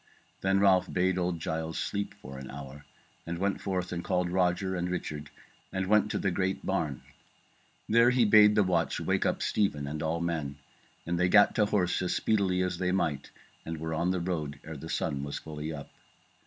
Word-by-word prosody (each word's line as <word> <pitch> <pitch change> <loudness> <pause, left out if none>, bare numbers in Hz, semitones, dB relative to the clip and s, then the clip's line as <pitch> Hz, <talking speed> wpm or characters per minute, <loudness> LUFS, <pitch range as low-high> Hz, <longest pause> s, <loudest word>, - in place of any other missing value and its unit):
Then 95 0 +2
Ralph 95 -2 +4
bade 95 0 +1
old 90 -1 -1
Giles 80 -1 -3
sleep 100 0 -3
for 65 +1 -10
an 65 - -8
hour, 70 +1 -9 0.4
and 85 0 -3
went 100 +2 -1
forth 90 -2 -2
and 85 -1 -3
called 90 -2 0
Roger 90 +1 +1
and 90 0 -2
Richard 75 -5 -4 0.4
and 95 0 -1
went 105 +2 +3
to - - -1
the 100 - 0
great 95 +1 -1
barn. 75 -9 -1 0.8
There 115 +2 +5
he 125 -2 +3
bade 105 0 +7
the 105 - +5
watch 85 -3 0
wake - - +1
up - - -1
Stephen 85 -9 0
and 75 +2 -4
all 80 +1 -1
men, 80 -5 -2 0.5
and 85 +1 -1
they 90 0 +3
gat 105 +2 +6
to 105 -3 +2
horse 95 -4 +1
as 90 - 0
speedily 95 -4 +1
as 90 -1 -2
they 90 -1 +1
might, 75 -7 -1 0.3
and 80 0 -5
were 80 +1 -4
on 85 +3 0
the 90 0 0
road 80 -5 -3
ere 80 0 -7
the 80 +3 -8
sun 70 -1 -1
was 70 0 -4
fully 75 0 -6
up. 70 -3 -8
90 Hz, 200 wpm, -29 LUFS, 80-95 Hz, 0.8 s, bade